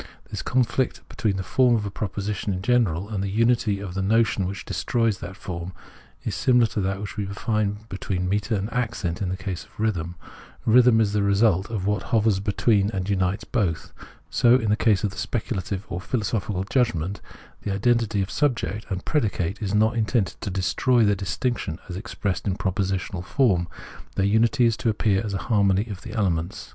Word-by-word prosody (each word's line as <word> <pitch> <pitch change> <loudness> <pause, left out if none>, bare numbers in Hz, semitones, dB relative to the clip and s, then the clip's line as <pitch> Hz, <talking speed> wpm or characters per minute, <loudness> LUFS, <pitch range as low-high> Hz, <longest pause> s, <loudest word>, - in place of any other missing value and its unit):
This - - -3
conflict 130 0 0
between 105 -3 -1
the 95 - -3
form 125 +3 +3
of 105 -2 -1
a 100 - -4
proposition 100 0 -3
in 95 0 -3
general 100 -7 +2
and 105 -3 -3
the 100 - -2
unity 115 -1 +2
of 95 -3 -6
the 95 - -2
notion 105 -1 +2
which 95 +1 -6
destroys 115 -4 0
that 95 +2 -7
form, 90 -1 -6 0.5
is - - -2
similar 125 -3 +4
to 110 -2 -2
what 100 +2 -3
we 100 -1 -2
find 105 +1 -2
between 95 -2 -3
metre 105 +3 0
and 100 +3 -3
accent 110 -8 -2
in 95 - -1
the 95 - -2
case 95 -3 -4
of - - -24
rhythm. 90 -6 -1 0.5
Rhythm 120 0 +6
is 105 -2 +2
the 105 - +2
result 100 -1 +3
of 105 -5 -3
what 105 -1 +1
hovers 110 -3 +3
between 100 0 +2
and 95 -3 -3
unites 95 +2 0
both. 85 -8 -1 0.4
So 120 0 +5
in 110 -5 +1
the - - +5
case 105 -2 +2
of 105 - 0
the - - -12
speculative 100 -3 -3
or 90 0 -4
philosophical 105 -4 -1
judg 120 +3 +1
ment; 90 +6 -4 0.4
the 100 - -3
identity 105 0 +2
of 95 - -7
subject 115 -3 -1
and 95 -2 -4
predicate 105 - 0
is 100 -1 -1
not 110 +2 +3
intended 110 -5 +1
to - - -3
destroy 95 - +2
their 105 - +4
distinction, 100 -2 -2
as 90 - -6
expressed 100 -1 -3
in 95 - +1
propositional 95 -2 -2
form; 95 -6 +2 0.5
their 95 - +2
unity 110 +4 +3
is 115 -2 +3
to 110 +1 0
appear 105 -1 +1
as 105 -3 -3
a - - -4
harmony 100 -1 +3
of 95 - -7
the - - -8
elements. 90 -5 -1
100 Hz, 195 wpm, -24 LUFS, 95-115 Hz, 0.5 s, Rhythm